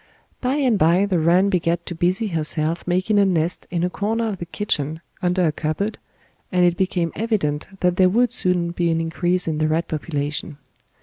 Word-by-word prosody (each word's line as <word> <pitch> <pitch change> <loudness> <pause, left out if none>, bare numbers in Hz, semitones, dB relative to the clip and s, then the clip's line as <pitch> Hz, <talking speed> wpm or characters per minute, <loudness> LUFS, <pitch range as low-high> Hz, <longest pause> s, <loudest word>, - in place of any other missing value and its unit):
By 255 +2 0
and 255 -8 +2
by 175 +5 +4
the 185 -4 +1
rat 180 +5 +3
began 170 -2 +1
to - - -5
busy 185 +6 0
herself 160 0 -2
making 185 +4 +2
a - - +6
nest 170 -2 -1
in 175 -1 -1
a 180 - +1
corner 225 +3 -1
of 200 - -4
the 170 - -6
kitchen 160 -6 -2 0.2
under 180 0 +2
a 155 - +2
cupboard, 155 +8 -2 0.5
and 180 -1 +3
it 175 -1 +3
became 175 -3 0
evident 195 -10 -1
that 180 -1 +2
there 185 -1 +5
would 240 +4 +2
soon 180 -4 0
be 170 0 0
an 165 0 +1
increase 175 +2 -1
in 155 -2 -1
the 155 - +2
rat 160 +2 0
population. 150 -1 -3
175 Hz, 195 wpm, -22 LUFS, 165-195 Hz, 0.5 s, a